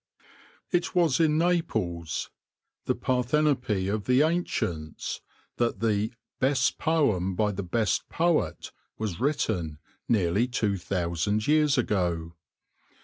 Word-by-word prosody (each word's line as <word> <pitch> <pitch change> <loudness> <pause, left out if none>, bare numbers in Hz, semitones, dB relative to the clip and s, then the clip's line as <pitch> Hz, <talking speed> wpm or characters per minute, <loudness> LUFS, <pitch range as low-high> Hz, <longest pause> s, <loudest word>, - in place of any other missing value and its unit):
IT 175 +1 0
was 170 -6 +3
in 155 -2 +3
Naples 110 - -1 0.3
— - - -58
the - - +2
Parthenope 125 -6 +1
of 105 -2 -3
the 125 +3 +4
Ancients 90 - -2 0.2
— - - -37
that 120 -1 +1
the 110 0 +1
" - - -61
best 135 -1 +2
poem 105 - +1
by 105 +2 +1
the 100 0 -4
best 105 +4 0
poet 170 -1 0
" - - -47
was 105 -6 -3
written, 105 - -1 0.3
nearly 100 +1 +2
two 110 -5 0
thousand 90 +3 -1
years 150 -1 +3
ago. 85 -8 0
110 Hz, 130 wpm, -27 LUFS, 90-150 Hz, 0.3 s, the